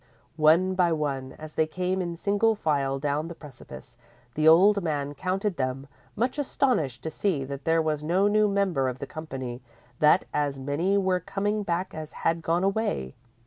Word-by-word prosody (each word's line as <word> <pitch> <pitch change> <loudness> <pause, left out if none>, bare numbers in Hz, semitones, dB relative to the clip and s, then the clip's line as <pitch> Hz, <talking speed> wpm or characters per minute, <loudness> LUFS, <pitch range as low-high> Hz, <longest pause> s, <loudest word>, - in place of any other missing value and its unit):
_ - - -4
_One 180 +5 +5
by 180 -2 +3
one, 140 -4 -2
as 155 0 -10
they 160 - +1
came 185 +3 -1
in 170 -1 -3
single 205 +5 +1
file 140 -7 0
down 145 +3 -1
the 170 - -8
precipice, 130 - -12 0.3
the 155 +3 +1
old 200 +6 +6
man 145 -4 -2
counted 190 +3 -2
them, 130 +1 -2 0.3
much 250 +6 -1
astonished 200 - 0
to 160 - -3
see 160 -4 -1
that 140 0 -7
there 165 0 +3
was 155 -1 -1
no 180 +6 +2
new 210 0 +3
member 190 -10 +1
of 125 - -5
the - - -5
company 130 -6 -6 0.4
that 155 +4 +5
as 145 -2 0
many 155 +9 0
were 185 -2 +1
coming 205 +4 -2
back 180 -1 -2
as 155 0 -7
had 165 0 -1
gone 170 +3 0
away. 195 - -1
160 Hz, 185 wpm, -26 LUFS, 145-190 Hz, 0.4 s, old